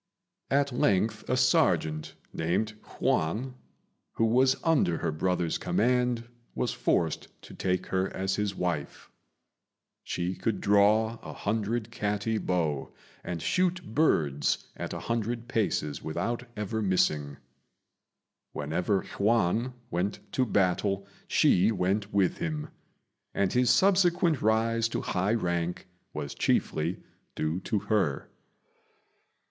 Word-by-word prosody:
At 140 0 +2
length 110 -2 +1
a 125 - +2
serjeant, 80 -11 +2 0.2
named 90 +7 0 0.3
Yüan, 110 +12 0 0.6
who 115 - +1
was 130 +4 +4
under 150 - +3
her - - -1
brother's 85 +1 0
command, 125 0 +1 0.3
was - - 0
forced 80 -3 0 0.2
to - - -11
take 90 -1 -1
her 95 0 +1
as 95 +1 -1
his 105 -2 -1
wife. 85 -5 -3 0.9
She 90 +1 -2
could 110 +3 -2
draw 110 +3 +3
a - - -8
hundred 110 +2 -2
catty 105 0 -1
bow, 80 -8 -1 0.3
and 85 -2 -4
shoot 180 -7 0
birds 75 - +1
at - - -5
a - - -5
hundred 115 +1 -2
paces 100 - -1
without 115 +10 -3
ever 105 +1 -2
missing. 75 -7 +1 1.2
Whenever 90 +7 0
Yüan 115 +3 +1 0.2
went 90 +4 -1
to 130 -1 +1
battle 100 0 +1 0.2
she 95 +5 +4
went 100 +1 0
with 100 -3 +1
him; 155 -2 -3 0.7
and 100 -2 +1
his 125 0 +3
subsequent 180 -5 +4
rise 115 +1 +2
to - - -2
high 95 +5 0
rank 85 -4 -2 0.3
was - - -5
chiefly 80 +4 0 0.3
due 80 +3 -1
to 105 +3 -1
her. 100 -9 0
105 Hz, 120 wpm, -28 LUFS, 90-115 Hz, 1.2 s, was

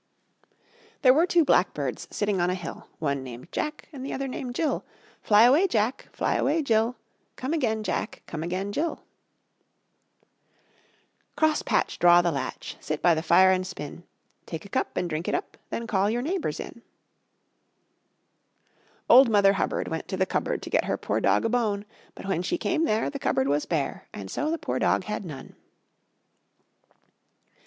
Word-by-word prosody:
There 255 -1 +8
were 325 +6 +3
two 340 -3 +4
blackbirds 145 - +1
sitting 205 -3 -1
on 175 - +2
a 180 - 0
hill, 185 - -8
One 140 -3 -1
named 125 +4 -10
Jack 300 0 -4
and 265 -2 -7
the 270 - -4
other 275 0 -3
named 255 -1 -5
Jill. 315 +1 0 0.4
Fly 210 +1 +5
away, 285 +11 +5
Jack! 230 - -1
Fly - - -1
away, 305 +4 +1
Jill! 230 -1 +2 0.4
Come 260 +5 -3
again, 225 -9 0
Jack! 215 - -3
Come 155 - -6
again, 185 +4 -3
Jill! 325 +10 -2 2.3
Cross 315 -1 +2
patch, - - 0
draw 175 0 +6
the 170 - +1
latch, 135 -3 -5
Sit 155 -1 -4
by 175 - +6
the 160 - -1
fire 185 +3 +5
and 185 0 0
spin; 170 -2 -8 0.4
Take 160 +1 -6
a - - -11
cup - - -2
and 180 - 0
drink 160 +1 -3
it - - +1
up, 365 - -4
Then 235 - -4
call 200 -2 +1
your 240 +3 -1
neighbors 350 +4 -2
in. - - -8 2.3
Old 255 +1 +8
Mother 200 -2 +5
Hubbard 195 - -1
Went 160 0 -4
to 190 - -3
the 190 - +2
cupboard - - -2
To - - -7
get - - +2
her - - -1
poor - - -2
dog - - +3
a - - +2
bone; 215 -4 0 0.3
But - - -10
when 195 -3 0
she 350 - -1
came 330 -2 0
there 215 - 0
The - - -5
cupboard 130 - +1
was 145 +1 0
bare, 155 -5 -2
And 95 -1 -8
so 300 - -1
the 330 - 0
poor - - -3
dog - - +2
had 210 -2 -4
none. 140 -5 -9
205 Hz, 175 wpm, -26 LUFS, 170-260 Hz, 2.3 s, There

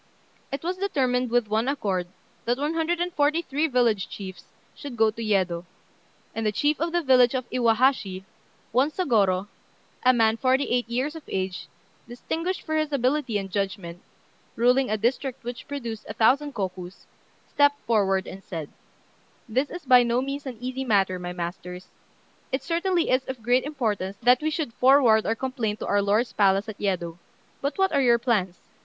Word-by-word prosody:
It 275 +2 -4
was 360 +2 -2
determined, 255 -10 0
with 240 -1 +1
one 220 +3 0
accord, 195 -10 -1 0.4
that 240 +1 +1
one 295 +3 -1
hundred 330 +1 0
and 350 0 -2
forty 300 +3 +2
three 295 +2 0
village 240 -7 +1
chiefs 190 -3 -8 0.3
should 275 -4 -9
go 220 0 +4
to 225 - -8
Yedo; 190 -6 0 0.7
and 225 - -3
the 215 - +1
chief 290 +8 +1
of 335 0 0
the 345 0 0
village 255 -2 +5
of 255 -1 -2
Iwahashi, 230 -5 +2 0.5
one 260 +6 +3
Sôgorô, 205 - +1 0.5
a 255 - +5
man 225 -2 +3
forty 260 +2 +2
eight 245 -1 0
years 260 +6 -1
of 320 - -7
age, 185 -1 -3 0.4
distinguished 330 +9 -4
for 315 - -3
his 310 -1 0
ability 260 -3 0
and 195 -1 -5
judgment, 190 -3 -3 0.5
ruling 250 +3 +3
a 215 - 0
district 250 +4 -1
which 240 0 -7
produced 235 -6 -6
a 210 - -5
thousand 275 +6 +2
kokus, 185 -2 -5 0.4
stepped 285 0 +3
forward, 195 -4 +2
and 195 +1 -9
said 160 -6 -6 0.8
"This 260 +5 0
is 350 -3 -8
by 250 -1 +7
no 240 0 +1
means 275 +2 -4
an 250 -3 -6
easy 255 +2 -4
matter, 195 -6 +1
my 175 0 -5
masters. 180 +1 -6 0.6
It 265 - -1
certainly 345 0 0
is 255 +1 +3
of 260 -4 -7
great 250 +3 +2
importance 210 -10 -2
that 250 +2 +5
we 310 - 0
should 305 -6 -3
forward 250 -4 +5
our 225 - +1
complaint 240 -4 -2
to - - -2
our 205 0 +2
lord's 210 +5 +1
palace 195 0 +3
at 220 - -8
Yedo; 175 -4 -2 0.4
but 280 +1 -2
what 385 0 +2
are 280 - +3
your 240 -2 +5
plans? 210 -7 0
240 Hz, 180 wpm, -25 LUFS, 205-275 Hz, 0.8 s, by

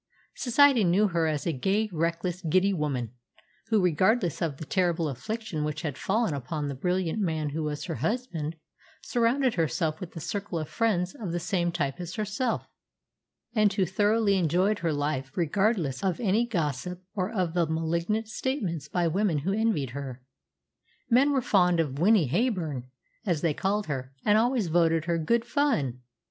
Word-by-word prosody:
Society 265 -1 +4
knew 195 +4 +3
her 170 -2 +1
as 150 -2 -1
a 170 - 0
gay, 195 +11 +1
reckless, 170 +2 -1
giddy 185 +4 +2
woman, 135 - -2 0.5
who, 220 -2 +3
regardless 180 - +2
of 155 -5 -1
the 160 - -7
terrible 175 -2 +1
affliction 160 - -4
which 150 +1 -3
had 145 -5 -2
fallen 215 +3 0
upon 145 +2 -3
the 140 - -3
brilliant 180 +6 -1
man 160 -6 -1
who 155 +3 -3
was 150 -1 -3
her 170 - -3
husband, 165 - -2 0.5
surrounded 245 +1 +2
herself 160 -1 0
with 180 -2 -8
a - - -4
circle 200 +2 -4
of 155 -2 -3
friends 185 -6 0
of 195 -7 -5
the 175 - -1
same 175 0 0
type 150 -2 -2
as 175 -1 -6
herself, 220 +3 -1 0.9
and 215 -3 +3
who 195 -1 +2
thoroughly 205 +1 +2
enjoyed 185 +5 +2
her 170 -1 0
life 145 -2 -1
regardless 175 - +1
of 185 -3 0
any 225 +2 +2
gossip 175 - -2
or 195 0 -2
of 185 -7 -1
the 175 -2 +2
malignant 170 +7 -1
statements 210 - -3
by 175 +2 0
women 185 0 +1
who 190 +7 -1
envied 210 - 0
her. 130 -2 -7 0.9
Men 265 +5 +5
were 265 -3 +1
fond 180 -6 +3
of 145 -4 -1
"Winnie 190 -3 +4
Heyburn," 165 - -1 0.4
as 175 -8 0
they 165 -3 +2
called 200 +5 -1
her, 135 -2 -5
and 210 - +5
always 235 0 +2
voted 165 -1 +2
her 170 -1 0
"good 235 +9 +1
fun." 235 - 0
175 Hz, 170 wpm, -27 LUFS, 155-210 Hz, 0.9 s, Men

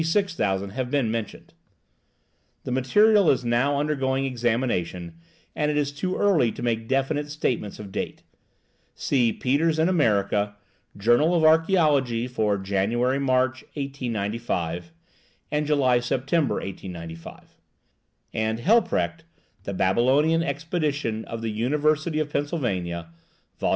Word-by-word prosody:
6000 160 - 0
have 130 +2 -3
been 130 -5 +1
mentioned); 115 -2 -5 1.1
the - - -5
material 205 - +4
is 130 -2 +2
now 130 +4 +2
undergoing 135 -2 0
examination, 115 -9 -1 0.4
and 150 0 0
it 150 - 0
is 145 -1 0
too 180 +6 -3
early 170 - +3
to - - -7
make 115 -2 -1
definite 140 +3 0
statements 130 -8 -2
of 100 -2 -9
date. - - -5 0.7
See 120 -4 +1
Peters 155 +7 +1
in 160 +1 +3
American 105 - +1 0.4
Journal 120 - +3
of 165 - +2
Archaeology 155 -7 +3
for 110 -5 0
January 105 +7 0
March, 130 -1 +1
1895, 115 - -3 0.6
and 150 0 0
July 130 -5 +3
September, 135 +5 0
1895; 85 -4 -8 0.8
and 110 0 -1
Hilprecht, 195 - +2 0.4
'The 100 - -3
Babylonian 135 - +3
Expedition 145 -6 -2
of 115 -1 -6
the 110 - -1
University 150 +7 0
of 150 -1 -2
Pennsylvania,' 95 - -2 0.5
Vol. - - 0
130 Hz, 120 wpm, -25 LUFS, 110-150 Hz, 1.1 s, material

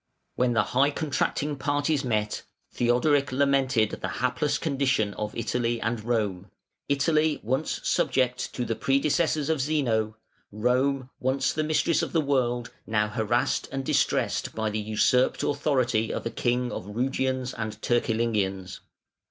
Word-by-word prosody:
When 125 -1 +1
the 110 -2 +3
high 135 +6 +2
contracting 145 0 -1
parties 145 +1 0
met, 105 -4 -1 0.3
Theodoric 130 +4 +2
lamented 135 -4 +2
the - - -2
hapless 150 - 0
condition 130 -9 0
of 105 0 -5
Italy 120 0 -1
and 115 -1 -2
Rome: 105 -5 -1 0.4
Italy 150 +2 +2
once 130 +7 -1
subject 125 -3 +1
to 125 - -2
the 115 - -1
predecessors 140 +5 +1
of 160 -3 +1
Zeno; 115 -7 0 0.3
Rome, 130 +4 0
once 130 +2 0
the 155 - -1
mistress 155 +1 +2
of - - -4
the 165 - +3
world, 125 -4 0 0.2
now 105 -1 +1
harassed 115 +2 0
and 135 0 -3
distressed - - 0
by 110 -1 -1
the 110 - -2
usurped 110 +4 +2
authority 130 -6 +1
of - - -4
a 115 - -2
king 125 0 0
of 90 - -6
Rugians 130 +3 -1
and 110 -2 -5
Turcilingians. 110 -6 0
125 Hz, 140 wpm, -26 LUFS, 110-140 Hz, 0.4 s, the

